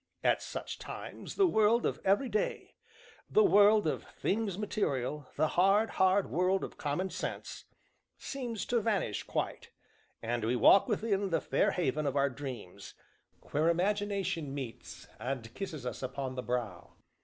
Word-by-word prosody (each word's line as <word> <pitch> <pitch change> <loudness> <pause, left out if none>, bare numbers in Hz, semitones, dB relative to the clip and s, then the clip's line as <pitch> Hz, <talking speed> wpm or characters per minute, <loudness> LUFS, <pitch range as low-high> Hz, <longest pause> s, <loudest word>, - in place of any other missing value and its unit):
At - - +3
such - - -6
times - - -8
the 395 - +5
world 230 - +3
of - - -1
every 200 +7 +3
day 215 -2 -2 0.6
the 430 - +5
world 210 - +6
of 155 - -1
Things 200 -3 -2
Material, 150 - -2
the 155 - +2
hard, 200 +4 +3
hard 190 +1 +2
world 185 +3 +2
of - - -6
Common 175 +6 -2
sense - - -5 0.5
seems 245 -6 -4
to 240 -2 +1
vanish 200 - 0
quite, - - -3 0.5
and 120 0 -2
we 115 +3 +1
walk 185 - +6
within 205 -3 0
the 170 - +1
fair - - +1
haven 155 -3 0
of 140 - -1
our 140 -1 +2
dreams, 120 -8 -8 0.6
where 155 +3 +2
Imagination 190 -4 0
meets, 130 -5 -7
and 120 -1 -4
kisses 160 -10 -6
us 125 - -4
upon 130 0 -4
the 130 - -4
brow. 120 -8 -4
180 Hz, 150 wpm, -31 LUFS, 130-205 Hz, 0.6 s, world